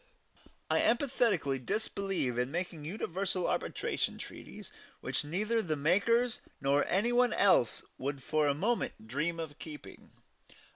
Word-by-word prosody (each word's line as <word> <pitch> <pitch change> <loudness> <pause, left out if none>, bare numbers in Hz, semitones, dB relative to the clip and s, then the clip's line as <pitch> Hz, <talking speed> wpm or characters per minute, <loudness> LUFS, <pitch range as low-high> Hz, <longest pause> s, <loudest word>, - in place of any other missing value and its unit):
I - - +3
emphatically 230 - +2
disbelieve 195 - -1
in 125 +1 0
making 170 -1 -4
universal 185 +1 -2
arbitration - - -1
treaties - - -9 0.3
which - - -2
neither 210 +9 0
the 160 -6 -1
makers 205 +11 +2 0.2
nor 140 +1 +2
any 205 +6 +2
one 245 0 +4
else 185 - +4 0.2
would 140 0 -3
for 155 +1 +2
a 140 - +2
moment 210 - -1
dream 150 +8 -1
of 155 -2 -6
keeping. 150 -2 -10
170 Hz, 130 wpm, -32 LUFS, 145-215 Hz, 0.3 s, one